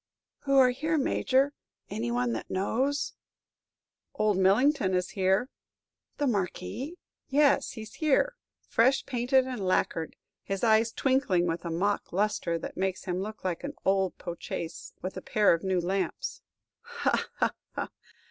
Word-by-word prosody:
"Who 275 0 +3
are 255 -2 +7
here, 310 +5 0
Major? 275 0 +2 0.3
Any 115 +2 -3
one 120 0 0
that 110 - -5
one - - -3
knows?" 275 +7 0 1.0
"Old 215 -1 +2
Millington 195 +2 +3
is 180 0 -1
here." 190 +4 +2 0.7
"The 290 - 0
Marquis?" 245 - -2 0.3
"Yes, 285 0 +3
he 220 -2 -7
's 215 - -13
here, 315 - +2 0.3
fresh 260 +4 +3
painted 255 +1 +2
and 250 -6 -4
lacquered; 165 -3 0 0.3
his 195 +2 -4
eyes 225 0 +4
twinkling 255 -11 +2
with 170 0 -2
a - - -2
mock 200 +5 0
lustre 190 -3 0
that - - -7
makes 190 0 -1
him 180 0 -2
look 215 +2 -6
like 180 -3 -2
an - - -5
old 190 -2 +2
po' 175 - -5
chaise 165 0 -5
with 185 +1 -4
a - - -4
pair 210 -4 +3
of 165 - -2
new 190 -1 +1
lamps!" 190 +3 -2 0.4
"Ha, 475 0 -1
ha, - - +1 0.2
ha!" - - -3
210 Hz, 155 wpm, -29 LUFS, 185-265 Hz, 1.0 s, are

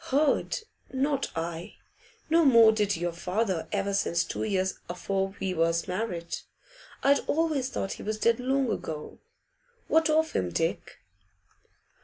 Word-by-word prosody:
'Heard? 295 - +1 0.3
Not 275 +1 0
I. 165 +1 -4 0.5
No 330 +1 +4
more 230 -6 +7
did 210 -2 +1
your 175 +1 -1
father 180 +1 -1
ever 200 -1 -1
since 170 -3 +1
two - - -5
years 190 -3 0
afore 195 +2 -2
we 190 -1 -1
was 165 0 +1
married. 180 -3 -3 0.7
I'd 280 +1 +5
always 300 -5 +1
thought 195 - -3
he - - -6
was 215 +1 -2
dead 230 +2 +2
long 265 0 +1
ago. 155 -1 -5 0.7
What 320 0 +3
of 315 +1 +3
him, 90 - -1
Dick? 165 - -2
205 Hz, 140 wpm, -28 LUFS, 175-270 Hz, 0.7 s, more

